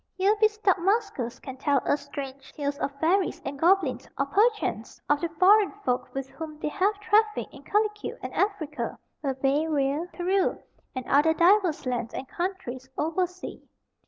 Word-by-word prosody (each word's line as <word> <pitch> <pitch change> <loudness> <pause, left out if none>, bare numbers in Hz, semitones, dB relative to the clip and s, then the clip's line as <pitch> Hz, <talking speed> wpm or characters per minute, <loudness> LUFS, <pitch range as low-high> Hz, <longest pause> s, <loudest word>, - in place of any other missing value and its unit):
Here 395 +3 +3
be 435 - +8
stout 420 -4 +1
maskers 395 - 0
can 265 -1 -8
tell 280 +1 +2
us 285 - +1
strange 275 -1 -7
tales 285 -1 -3
of 280 - -1
fairies 360 +5 +2
and 275 0 -5
goblins, 320 -8 +2
or, 275 - +1
perchance, 400 - +1
of 290 0 +2
the 340 - -1
foreign 400 +3 +6
folk 250 0 0
with 270 -1 -3
whom 310 +2 -8
they 300 - -2
have 400 +5 +1
trafficked 425 0 +2
in - - -12
Calicute 420 0 -1
and - - -5
Affrica, 345 -7 -1 0.3
Barbaria, 280 +3 0
Perew, 375 +2 +1 0.4
and 255 -1 -4
other 310 +3 +4
diverse 355 -3 +4
lands 245 -2 -2
and 265 - -5
countries 265 -9 -4
over 330 +4 +1
sea. 360 +1 -9
320 Hz, 160 wpm, -27 LUFS, 275-395 Hz, 0.4 s, be